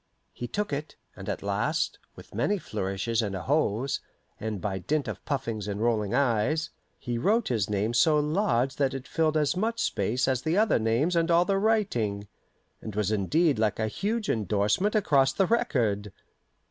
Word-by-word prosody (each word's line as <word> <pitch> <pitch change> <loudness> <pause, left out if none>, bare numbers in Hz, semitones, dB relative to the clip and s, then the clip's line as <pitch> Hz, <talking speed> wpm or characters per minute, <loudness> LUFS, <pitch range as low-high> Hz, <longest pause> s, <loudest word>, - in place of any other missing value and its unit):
He 120 - -5
took 205 -1 -2
it, 150 +2 -4 0.2
and - - -7
at - - -3
last, - - -1 0.2
with - - -14
many 205 - +1
flourishes 105 - -2
and 100 -3 -3
ahos, 130 +2 0 0.4
and 110 -2 -3
by 95 -1 -3
dint 145 - -1
of - - -6
puffings 115 -8 -3
and 100 0 -3
rolling 110 -2 +1
eyes, 140 +5 +1 0.3
he 120 -2 -3
wrote 220 - +2
his 110 -6 0
name 105 +3 0
so 150 +6 +4
large 145 - +1
that 135 -1 +1
it 135 0 -6
filled 160 -1 +1
as 150 0 +1
much 225 +5 -1
space 125 - 0
as 130 -2 +1
the 160 +6 0
other 215 - +3
names 115 +11 +1
and 165 0 +2
all 170 +1 +4
the 195 0 +1
writing, 125 - 0 0.5
and 110 -3 -7
was 105 -1 0
indeed 140 - +2
like 110 -2 +1
a 110 - 0
huge 210 - -2
indorsement 105 - +1
across 140 -10 +3
the 195 - +2
record. 110 - 0
130 Hz, 175 wpm, -27 LUFS, 105-165 Hz, 0.5 s, so